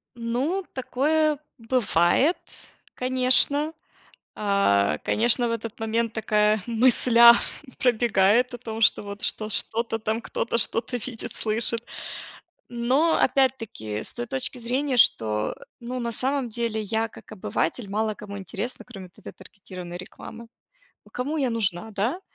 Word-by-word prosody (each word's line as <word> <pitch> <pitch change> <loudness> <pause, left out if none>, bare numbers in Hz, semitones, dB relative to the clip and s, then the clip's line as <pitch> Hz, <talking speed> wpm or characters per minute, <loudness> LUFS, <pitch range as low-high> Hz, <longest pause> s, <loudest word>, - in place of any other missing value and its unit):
Ну, 255 +11 -2
такое 300 +4 0 0.2
бывает, 230 - +2 0.6
конечно. 260 +4 +5 0.6
А, 100 - +1
конечно, 240 +2 +2
в - - -3
этот 230 -1 -5
момент 225 +1 -1
такая 210 -1 +1
мысля 235 0 +6 0.5
пробегает 240 0 +2
о - - -6
том, 225 -2 -7
что 210 - +4
вот 200 +1 -9
что 215 - -2
что-то 225 +1 -1
там 220 +1 -2
кто-то 235 - -3
что-то 235 +2 +1
видит, 230 -1 -7
слышит. 230 +1 +1 0.8
Но 255 +7 +1
опять-таки, 225 - -1
с - - -3
той 240 0 -5
точки 260 0 -2
зрения, 255 +3 -1
что, 110 - +2 0.3
ну, 245 +1 -5
на 235 -1 -3
самом 265 +2 -1
деле 230 -1 -2
я, 220 +2 -1
как 225 - -15
обыватель, 200 +1 -3
мало 215 +1 -1
кому 205 -1 -9
интересна, 205 +5 -6
кроме 195 -7 -11
вот 180 - -30
этой - - -10
таргетированной 180 -3 -10
рекламы, 225 +5 -10 0.6
ну, - - -19
кому 285 +6 -3
я 270 -3 0
нужна, 210 -3 -2
да? 225 - -2
230 Hz, 135 wpm, -24 LUFS, 210-250 Hz, 0.8 s, мысля